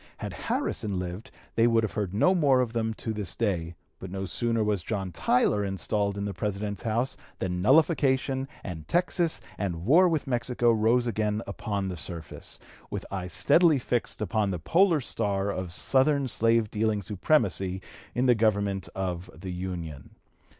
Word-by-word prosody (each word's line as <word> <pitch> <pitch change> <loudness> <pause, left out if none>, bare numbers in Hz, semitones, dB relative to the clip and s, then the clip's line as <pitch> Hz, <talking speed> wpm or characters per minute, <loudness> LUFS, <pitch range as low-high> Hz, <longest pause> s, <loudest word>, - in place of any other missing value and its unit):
Had - - -5
Harrison 100 -3 -2
lived 90 +3 -5 0.2
they 115 +1 +4
would 115 -1 +3
have 110 - -2
heard 105 -4 -2
no 110 - +3
more 145 -7 +4
of 120 -3 0
them 110 -1 0
to 110 - -4
this 105 -4 -4
day, 90 -7 -1 0.2
but 95 - -7
no 95 +1 -4
sooner 115 +5 0
was 105 -3 0
John 95 -2 -3
Tyler 105 +3 +2
installed 100 +2 -1
in 100 - -2
the 100 - -3
President's 100 0 -3
House 120 +4 -1 0.2
than 90 -1 -2
nullification 135 - +3 0.2
and 80 -5 -7
Texas 175 -1 +1 0.2
and 90 -3 -3
war 175 - +6
with 160 -3 0
Mexico 120 -1 +1
rose 115 +2 +3
again 110 -2 -1
upon 100 -3 -3
the 90 -2 -4
surface, 80 -1 -6 0.3
with - - -5
eye 95 -2 -3
steadily 155 - +4
fixed 120 -3 -2
upon 105 -1 0
the 90 - -1
Polar 165 - +3
Star 100 -4 -1
of 90 -3 -4
Southern 135 - +2
slave 115 -2 +2
dealing 105 -1 0
supremacy 95 - +1 0.4
in 125 - +2
the 125 - +6
government 100 -4 0
of 90 -2 -3
the 95 -2 -6
Union." 85 -6 -6
105 Hz, 165 wpm, -27 LUFS, 95-120 Hz, 0.4 s, war